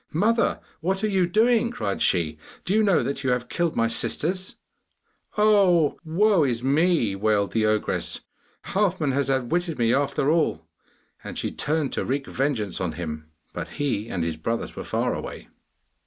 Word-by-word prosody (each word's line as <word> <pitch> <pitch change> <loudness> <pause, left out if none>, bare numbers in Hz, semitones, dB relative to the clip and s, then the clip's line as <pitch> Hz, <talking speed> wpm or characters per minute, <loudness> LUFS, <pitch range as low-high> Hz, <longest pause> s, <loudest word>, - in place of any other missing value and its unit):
'Mother, 225 +8 +2 0.2
what 190 +4 -1
are - - +3
you 190 -4 +2
doing?' 230 +5 +3
cried 105 - -3
she. 80 -4 +1 0.3
'Do 185 - 0
you 220 - +4
know 200 -5 +3
that 140 +1 -3
you 130 - 0
have 125 0 -1
killed 170 -2 -1
my 115 - +2
sisters?' 180 +10 -1 0.8
'Oh, 195 -7 +4
woe 180 +2 +3
is 120 -3 -1
me!' 140 - +2
wailed 105 0 +1
the 110 -1 +1
ogress. 110 0 0 0.4
'Halfman 185 -7 0
has 140 +1 0
outwitted 160 +6 0
me 115 -1 +2
after 140 +1 +1
all!' 150 - +1 0.6
And - - -7
she - - -2
turned 150 -2 -1
to - - -1
wreak 135 +1 -2
vengeance 125 -9 -1
on 85 -4 -2
him, 75 -2 -6 0.2
but - - -5
he 120 -7 -1
and 90 -6 -2
his 80 -1 -2
brothers 115 +9 -3
were - - -5
far - - -1
away. - - -7
140 Hz, 170 wpm, -25 LUFS, 110-180 Hz, 0.8 s, you